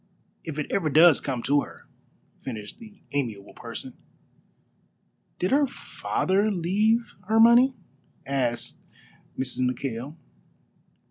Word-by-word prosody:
"If 155 -2 -6
it 150 - -1
ever 165 -6 +1
does 160 +1 +6
come 125 -4 -3
to 145 +2 +3
her," - - -11 0.6
finished 110 -5 -7
this 225 - -11 0.2
amiable 115 -8 -3
person. - - -8 1.4
"Did 180 - -1
her 285 +1 +4
father 200 -4 -1
leave 210 +5 +1
her 220 +1 +3
money?" 240 +3 +6 0.5
asked 125 -4 -1 0.6
Mrs. 130 -1 -2
McKail. 125 +2 -2
155 Hz, 110 wpm, -26 LUFS, 130-215 Hz, 1.4 s, does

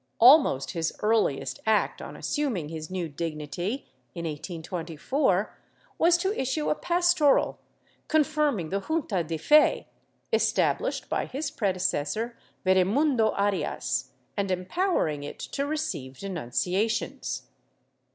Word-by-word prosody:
Almost 250 - +6
his 165 -1 -2
earliest 215 -10 +1
act 215 -1 +2
on - - -8
assuming 240 - -2
his 155 -1 -6
new 185 -2 -2
dignity, 160 - -4 0.3
in 170 - -4
1824, 170 - -2 0.4
was 340 +1 +5
to 380 +4 0
issue 265 - -1
a - - +5
pastoral 345 -2 +2 0.5
confirming 295 - +1
the 195 - 0
junta 230 - -1
de 160 0 -3
fe, 300 - +4 0.5
established - - +1
by - - -1
his 280 +2 -3
predecessor 190 - -1 0.3
Veremundo 220 +6 +3
Arias, 200 -1 -1 0.3
and 200 -2 -1
empowering 185 - 0
it 145 - -7
to 280 0 -3
receive 295 - -3
denunciations. 185 - -2
200 Hz, 110 wpm, -27 LUFS, -, 0.5 s, Almost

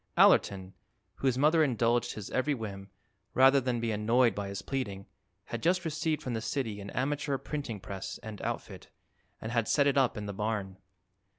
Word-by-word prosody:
Allerton, 95 -1 +4 0.4
whose 130 -2 +1
mother 155 +4 +4
indulged 120 -3 +1
his 105 -3 -7
every 145 +3 +1
whim, 100 -4 -7 0.5
rather 135 +1 +6
than 125 -1 -1
be 115 -1 -1
annoyed 115 +2 +3
by 100 0 -4
his 100 0 -5
pleading, 100 -8 -3 0.4
had 120 - -5
just 180 +1 +2
received 155 0 -1
from 125 - -3
the 110 - -2
city 110 -7 -3
an 100 - -7
amateur 140 +1 -1
printing 140 -7 -5
press 95 0 -6
and 110 -2 -7
outfit - - -5 0.5
and 110 - -5
had 115 -2 +1
set 145 - +3
it 140 -1 +3
up 125 -4 +2
in 105 - -4
the 100 - -4
barn. 100 -2 -3
115 Hz, 180 wpm, -30 LUFS, 100-135 Hz, 0.5 s, rather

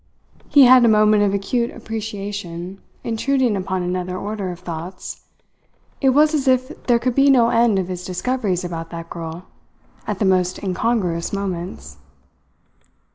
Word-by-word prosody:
He 285 - +7
had 255 0 +7
a - - +5
moment 215 -1 +4
of 205 -1 +2
acute 235 +5 -1
appreciation 205 -5 -6 0.2
intruding 245 0 0
upon 185 -1 -2
another 180 0 -3
order 205 -1 -4
of 175 - -10
thoughts. 170 +2 -7 0.8
It 270 - +4
was 300 +4 +4
as 285 -3 0
if 255 0 +3 0.2
there 240 -2 +5
could 245 +1 -1
be 275 +2 +4
no 240 -4 +5
end 230 -3 +3
of 185 -2 -1
his 180 -1 -5
discoveries 185 0 -2
about 165 -1 -5
that 165 -1 -8
girl, 165 +1 -7 0.6
at - - -2
the 210 - 0
most 185 0 +1
incongruous 185 -3 -1
moments. 180 - -5
200 Hz, 150 wpm, -20 LUFS, 180-235 Hz, 0.8 s, He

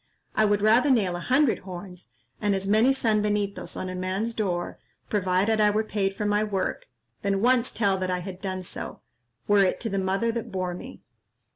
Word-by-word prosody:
I 215 - +3
would 205 -1 +1
rather 230 +7 +5
nail 205 -9 +2
a - - -4
hundred 260 - +2
horns, 180 -1 -9 0.3
and 205 -2 +2
as 195 0 -3
many 220 +6 +4
sanbenitos, 210 -5 0
on 185 - -3
a 185 - -4
man's 190 +5 -2
door, 185 -6 -2 0.3
provided 205 +2 +2
I 210 - +5
were 215 +1 +1
paid 195 -2 -1
for 210 - -3
my 205 +1 +2
work, 200 -3 -2 0.3
than 200 -1 0
once 250 +2 +3
tell 195 -4 +1
that 185 0 -2
I 180 - 0
had 185 0 -8
done 185 -2 -3
so, - - -6 0.5
were 205 -1 +5
it 185 - +1
to 225 - -2
the 195 -1 -1
mother 195 +5 0
that 235 0 -5
bore 185 -1 -2
me." 255 +9 -10
205 Hz, 195 wpm, -26 LUFS, 185-220 Hz, 0.5 s, rather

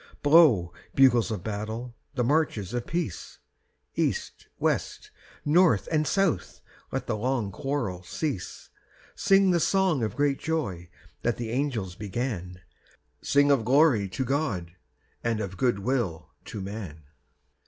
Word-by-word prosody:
III. - - -23
Blow, 145 - +5 0.2
bugles 125 -6 +5
of 105 -5 -4
battle, 110 +3 -5 0.2
the 125 - +1
marches 120 - 0
of 120 -1 -3
peace; 165 - -4 0.6
East, - - -2
west, - - -1 0.3
north, 170 +4 +4
and 155 -2 +2
south 195 -4 0 0.3
let - - -2
the - - -1
long 115 -2 -1
quarrel 115 -6 -3
cease 125 - -5 0.4
Sing 195 -1 +4
the 175 - +3
song 185 -5 +2
of 110 - -2
great 145 -1 +1
joy 95 - -3 0.3
that 120 -1 0
the 115 -2 -4
angels 120 -8 -1
began, 95 -3 -4 0.6
Sing 145 0 +3
of 135 -5 +3
glory 125 -5 +4
to 130 +8 -3
God 120 - -1 0.5
and 115 -2 0
of 100 -3 -4
good 120 +2 +1
will 100 -6 -2
to 105 - -6
man! 95 -6 -7
120 Hz, 135 wpm, -27 LUFS, 100-145 Hz, 0.6 s, Blow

